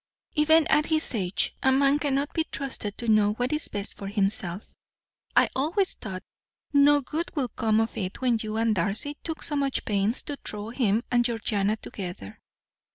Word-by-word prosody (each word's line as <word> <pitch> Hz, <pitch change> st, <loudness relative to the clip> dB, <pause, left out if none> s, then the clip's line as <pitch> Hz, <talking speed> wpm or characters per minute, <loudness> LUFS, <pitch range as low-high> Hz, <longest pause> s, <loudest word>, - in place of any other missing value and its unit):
Even 315 Hz, +1 st, +5 dB
at 300 Hz, -, +3 dB
his 315 Hz, -3 st, 0 dB
age 190 Hz, -4 st, 0 dB
a 265 Hz, -, +4 dB
man 275 Hz, +2 st, +4 dB
cannot 285 Hz, 0 st, 0 dB
be 320 Hz, -, +1 dB
trusted 255 Hz, -9 st, -4 dB
to 235 Hz, -, -5 dB
know 210 Hz, -1 st, +4 dB
what 245 Hz, +5 st, -1 dB
is 300 Hz, 0 st, +1 dB
best 200 Hz, 0 st, -4 dB
for 195 Hz, -, -7 dB
himself. 195 Hz, -2 st, -2 dB, 0.6 s
I -, -, +6 dB
always 340 Hz, +8 st, +1 dB
thought 190 Hz, -4 st, -7 dB, 0.5 s
no 290 Hz, 0 st, +6 dB
good 315 Hz, +6 st, -3 dB
would 265 Hz, -5 st, -2 dB
come 220 Hz, -1 st, +2 dB
of 225 Hz, 0 st, -1 dB
it 185 Hz, -2 st, -4 dB
when 245 Hz, -3 st, +2 dB
you 215 Hz, 0 st, -3 dB
and 225 Hz, -1 st, +2 dB
Darcy 210 Hz, -, -1 dB
took 320 Hz, -1 st, -5 dB
so 295 Hz, -, -3 dB
much 275 Hz, -2 st, 0 dB
pains 205 Hz, +3 st, 0 dB
to 290 Hz, -, -5 dB
throw 210 Hz, +1 st, -5 dB
him 230 Hz, -3 st, +1 dB
and 240 Hz, -1 st, +4 dB
Georgiana 215 Hz, -3 st, 0 dB
together. 175 Hz, -, -7 dB
235 Hz, 180 wpm, -26 LUFS, 205-285 Hz, 0.6 s, I